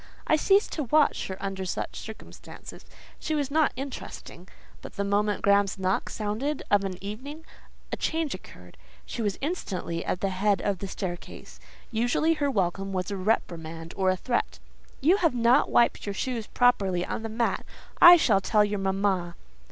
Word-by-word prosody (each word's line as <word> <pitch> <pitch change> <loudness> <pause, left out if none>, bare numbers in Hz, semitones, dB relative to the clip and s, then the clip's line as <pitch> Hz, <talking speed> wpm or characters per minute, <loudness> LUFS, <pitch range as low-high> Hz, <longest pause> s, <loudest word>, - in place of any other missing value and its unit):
I - - +4
ceased 395 +6 +3
to 300 - -3
watch 300 +5 +2
her 190 - -6
under 195 -1 -4
such 185 - -4
circumstances: 220 0 -11 0.3
she 315 - -2
was 285 -2 -1
not 310 0 +3
interesting. 270 +2 -8 0.3
But - - -10
the 200 - -1
moment 205 +1 0
Graham's 200 -1 +3
knock 190 0 -1
sounded 225 +8 -3
of 205 -1 +4
an 190 -2 -4
evening, 275 +10 -7 0.5
a - - -2
change 320 -3 -1
occurred; - - -12 0.3
she 235 - -5
was 205 -3 -1
instantly 195 - -3
at 180 - -3
the 195 - +1
head 195 +1 +1
of 200 -3 -1
the 195 - -5
staircase. 185 -2 -7 0.3
Usually 245 +8 +2
her 290 -3 0
welcome 195 -3 -1
was 185 +1 -2
a - - -2
reprimand 165 -5 -2
or 190 -1 +2
a 185 - +1
threat. 240 +5 -2 0.4
"You 340 +8 +4
have 330 -9 +1
not 235 +1 +4
wiped 235 -3 +2
your 200 - -3
shoes 235 -1 -3
properly 195 -8 +2
on - - -4
the 225 - -5
mat. 230 +2 -1 0.4
I 350 0 +11
shall 210 - +3
tell 210 +1 +3
your 205 0 -2
mamma." 190 -3 0
205 Hz, 175 wpm, -27 LUFS, 190-260 Hz, 0.5 s, I